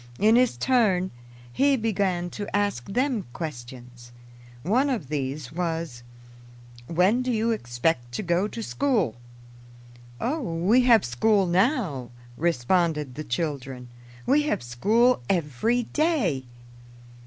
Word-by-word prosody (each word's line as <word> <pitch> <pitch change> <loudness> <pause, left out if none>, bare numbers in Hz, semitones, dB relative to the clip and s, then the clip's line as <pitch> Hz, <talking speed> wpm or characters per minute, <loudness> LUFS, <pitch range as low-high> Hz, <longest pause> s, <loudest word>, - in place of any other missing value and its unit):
In 220 +2 +4
his 250 0 +3
turn, 210 -8 +2 0.4
he 275 - +3
began 190 -6 -1
to 205 -1 -5
ask 205 -12 -1
them 245 - 0
questions. 120 -5 -8 0.5
One 250 - +2
of 215 - -3
these 140 -2 -3
was, 165 -7 -3 0.9
"When 185 - +2
do 255 0 -1
you 225 0 +1
expect 120 - -1
to 170 - -3
go 175 +3 +1
to 230 +1 -6
school?" 220 - 0 1.0
"Oh, 290 +7 -1
we 190 +4 +2
have 230 - +5
school 195 - +2
now," 180 - 0 0.3
responded 160 -1 0
the 155 - -6
children. 130 -3 -4 0.4
"We 295 - +4
have - - -1
school 215 - +2
every 185 - +1
day." 240 - 0
180 Hz, 120 wpm, -25 LUFS, 135-230 Hz, 1.0 s, have